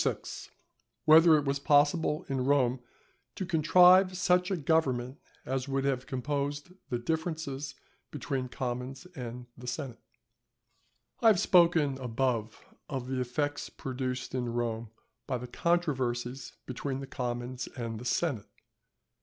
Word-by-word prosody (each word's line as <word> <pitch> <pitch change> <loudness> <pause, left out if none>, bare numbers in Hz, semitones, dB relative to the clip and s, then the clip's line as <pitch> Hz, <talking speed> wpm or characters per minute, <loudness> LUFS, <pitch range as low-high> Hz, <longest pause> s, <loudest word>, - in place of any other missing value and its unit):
—_Whether 160 +1 +8
it 145 - -1
was 140 0 0
possible 150 +3 +3
in 135 -2 -1
Rome 130 -2 +2 0.6
to 190 - -3
contrive 180 +3 +6
such 180 0 +2
a 190 - 0
Government 135 -5 0 0.3
as 130 0 -2
would 135 0 -1
have 135 -2 -1
composed 145 +3 -2 0.2
the 120 - 0
Differences 150 -1 -3 0.3
between 135 -2 -3
the - - -9
Commons 125 +4 -4
and 125 -2 -6
the 125 0 -11
Senate._ 125 -1 -4 1.2
I - - +5
have 210 -5 +6
spoken 170 -7 +4
above 120 -3 -2 0.2
of 130 -3 -4
the 130 -1 -1
effects 145 +4 -2
produced 130 -1 -4
in 125 -2 -2
Rome 115 -1 -2 0.4
by 130 -3 -1
the 125 - -7
controversies 130 -6 -1
between 130 +1 -4
the 135 - -5
commons 125 -1 -4
and 115 -3 -4
the 125 - -9
senate. 125 -4 -1
135 Hz, 130 wpm, -30 LUFS, 125-155 Hz, 1.2 s, Whether